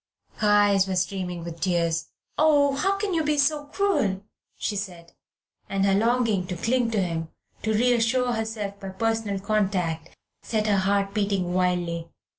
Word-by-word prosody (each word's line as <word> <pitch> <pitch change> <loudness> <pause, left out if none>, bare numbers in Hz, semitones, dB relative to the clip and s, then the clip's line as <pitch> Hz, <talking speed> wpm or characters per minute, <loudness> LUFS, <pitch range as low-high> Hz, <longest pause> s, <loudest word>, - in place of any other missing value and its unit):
Her 210 - +1
eyes 205 -2 +4
were 190 - -1
streaming 180 -2 -2
with 170 0 -7
tears. 170 -3 0 0.3
"Oh, 290 -2 +4
how 390 +8 +1
can 400 -2 -2
you 325 -2 +1
be 300 0 +1
so 290 +1 +2
cruel?" 285 - 0 0.3
she 210 - -2
said, 180 -4 -6 0.6
and 195 0 +1
her 195 - +3
longing 220 -3 +2
to 180 - -4
cling 235 +6 +1
to 220 -2 0
him, 165 -2 -3 0.3
to 220 - -1
reassure 245 +2 +2
herself 220 -3 -4
by 195 - -6
personal 220 0 -1
contact, 190 -6 -1 0.2
set 215 -2 -1
her 205 -2 +3
heart 195 +1 +1
beating 200 -4 0
wildly. 175 -2 0
200 Hz, 160 wpm, -25 LUFS, 185-230 Hz, 0.6 s, eyes